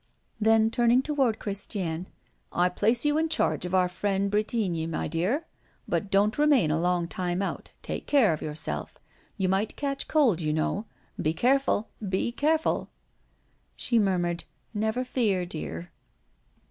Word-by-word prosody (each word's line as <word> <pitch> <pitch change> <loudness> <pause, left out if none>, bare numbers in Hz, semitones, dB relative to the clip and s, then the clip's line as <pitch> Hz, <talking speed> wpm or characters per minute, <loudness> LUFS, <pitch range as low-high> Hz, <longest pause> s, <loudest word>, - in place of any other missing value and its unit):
Then, 220 0 +4
turning 240 +1 +3
toward 270 -7 +1
Christiane: 190 -4 -4 0.4
"I 180 +1 +2
place 225 +8 +1
you 295 +1 +3
in 320 0 0
charge 310 - 0
of 180 +1 -1
our 180 -1 +4
friend 195 +2 -1
Bretigny, 205 -6 0
my 165 - -2
dear; 200 - 0 0.4
but 205 - -1
don't 205 +5 +2
remain 285 - +4
a 160 +2 +1
long 175 -1 +1
time 180 +1 -2
out - - -5
take - - -5
care 250 - +4
of 155 - -5
yourself. 155 +1 -3 0.4
You 190 -2 +1
might 195 +3 0
catch 275 -1 -3
cold, 250 - +3
you 155 -1 0
know. 195 +7 -1 0.3
Be 155 +1 0
careful! 255 0 +2 0.2
be 190 +5 0
careful!" 310 +5 +1 0.9
She 235 -2 +1
murmured: 175 -4 0 0.3
"Never 220 +4 -1
fear, 210 -8 +1
dear." 90 - -6
205 Hz, 145 wpm, -27 LUFS, 175-240 Hz, 0.9 s, Then